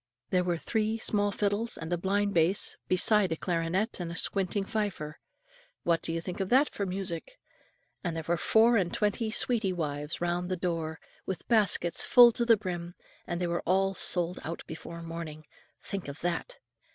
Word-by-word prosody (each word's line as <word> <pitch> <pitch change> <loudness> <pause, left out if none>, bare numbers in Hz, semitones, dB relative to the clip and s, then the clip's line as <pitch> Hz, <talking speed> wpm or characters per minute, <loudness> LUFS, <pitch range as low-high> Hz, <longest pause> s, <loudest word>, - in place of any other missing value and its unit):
There 180 -1 +3
were 175 -1 0
three 220 +5 -1
small 205 -2 0
fiddles 205 +3 -1
and 165 +1 -4
a - - +3
blind 200 +3 0
bass, 170 +4 +2
besides 190 0 +4
a - - -2
clarionet 175 +5 -1
and 170 -1 -4
a - - -6
squinting 195 +1 0
fifer; 195 -9 -3 0.6
what 170 -1 +2
do - - -3
you 165 - -1
think 180 +3 -6
of 190 -1 -2
that 270 +4 +4
for 200 - -3
music? 185 - -4 0.7
And 175 -3 -2
there 160 -1 -4
were 170 - +2
four 225 +7 +4
and 180 -4 0
twenty 210 +2 0
"sweetie 215 -3 +2
wives" 150 -3 -3
round 175 +1 -1
the 185 - -1
door, 165 -3 -3 0.3
with 190 - -5
baskets 200 -6 +3
full 240 -1 +8
to 235 +1 -1
the 230 -2 +6
brim; 175 -3 -5 0.3
and 175 - -3
they 180 - 0
were 170 0 -1
all 195 +2 +2
sold 180 -1 +1
out 165 +1 -5
before 170 +1 -8
morning, 165 -2 -7 0.4
think 195 -5 -5
of 140 +2 -8
that. 175 - -3
180 Hz, 185 wpm, -29 LUFS, 170-205 Hz, 0.7 s, full